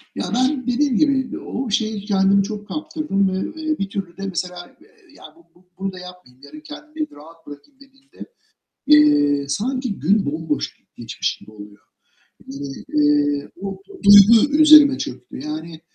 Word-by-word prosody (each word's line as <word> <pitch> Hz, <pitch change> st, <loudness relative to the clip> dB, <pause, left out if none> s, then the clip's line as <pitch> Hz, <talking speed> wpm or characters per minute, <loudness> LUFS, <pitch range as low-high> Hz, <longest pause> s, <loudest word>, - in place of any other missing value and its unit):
Ya, -, -, -3 dB
ben 255 Hz, +1 st, 0 dB
dediğim 250 Hz, 0 st, +1 dB
gibi 270 Hz, -4 st, 0 dB
o 255 Hz, -2 st, -5 dB
şeye 220 Hz, -1 st, -1 dB
kendimi 200 Hz, -1 st, +2 dB
çok 210 Hz, 0 st, -7 dB
kaptırdım 305 Hz, -, -2 dB
ve, 190 Hz, +12 st, -5 dB
eee, 310 Hz, 0 st, -2 dB
bir 195 Hz, 0 st, -3 dB
türlü 190 Hz, -3 st, -6 dB
de 195 Hz, -, -6 dB
mesela 180 Hz, -1 st, -6 dB, 0.4 s
ya -, -, -17 dB
"Bu 340 Hz, -, -22 dB
bu 180 Hz, -, -26 dB
bunu 195 Hz, 0 st, -3 dB
da 185 Hz, -, -10 dB
yapmayayım, 180 Hz, -8 st, -14 dB
yarın 305 Hz, -, -12 dB
kendimi 305 Hz, 0 st, -8 dB
rahat 160 Hz, +3 st, -17 dB
bırakayım." 145 Hz, -, -14 dB
dediğimde, 275 Hz, 0 st, -16 dB, 0.6 s
eee, 145 Hz, -, +4 dB
sanki 245 Hz, -, -3 dB
gün 195 Hz, +4 st, +1 dB
bomboş 155 Hz, 0 st, -4 dB, 0.2 s
geçmiş -, -, -4 dB
gibi -, -, -17 dB
oluyor. 105 Hz, -1 st, -14 dB, 1.1 s
Eee, 145 Hz, -1 st, +1 dB
bu 195 Hz, -, -6 dB, 0.2 s
duygu 210 Hz, +8 st, +7 dB
üzerime 300 Hz, -3 st, +7 dB
çöktü -, -, -8 dB
yani 155 Hz, +2 st, -7 dB
200 Hz, 145 wpm, -20 LUFS, 165-270 Hz, 1.1 s, duygu